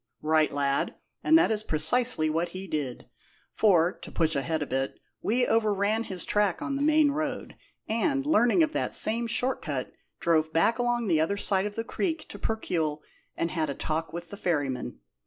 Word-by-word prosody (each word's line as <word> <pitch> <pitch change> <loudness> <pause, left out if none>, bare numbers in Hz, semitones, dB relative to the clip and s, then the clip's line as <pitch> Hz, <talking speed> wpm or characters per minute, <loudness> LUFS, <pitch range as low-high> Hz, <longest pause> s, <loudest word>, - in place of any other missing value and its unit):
"Right, 155 0 +3
lad; 140 -1 0 0.3
and 320 - +6
that 335 -7 +3
is 215 -1 0
precisely 160 +3 +3
what 165 +3 -1
he 190 - -6
did; 145 -8 -4 0.5
for 180 -5 +4
to - - -10
push 160 -1 +1
ahead 155 +3 -1
a - - -4
bit 135 0 -3 0.2
we 245 +3 +1
overran 215 0 +1
his 185 -3 -3
track 205 -3 +1
on 275 - -3
the 275 - -2
main 305 0 +4
road, 290 -3 -4 0.3
and, 275 +5 0
learning 305 +1 +4
of 315 - -1
that - - -2
same 230 +2 +1
short 250 +2 0
cut, 140 -6 -4 0.3
drove 160 -2 +2
back 165 +10 +2
along 240 -1 0
the 160 -4 +3
other 200 +6 0
side 195 -1 +1
of 205 - -8
the 225 - -2
creek 320 +6 -3
to - - -9
Percuil, 160 -9 -2 0.4
and 165 - -1
had 160 -3 -1
a 140 - -3
talk 160 +3 -2
with 170 0 -7
the 200 - -7
ferryman. 140 - -2
195 Hz, 190 wpm, -27 LUFS, 155-240 Hz, 0.5 s, and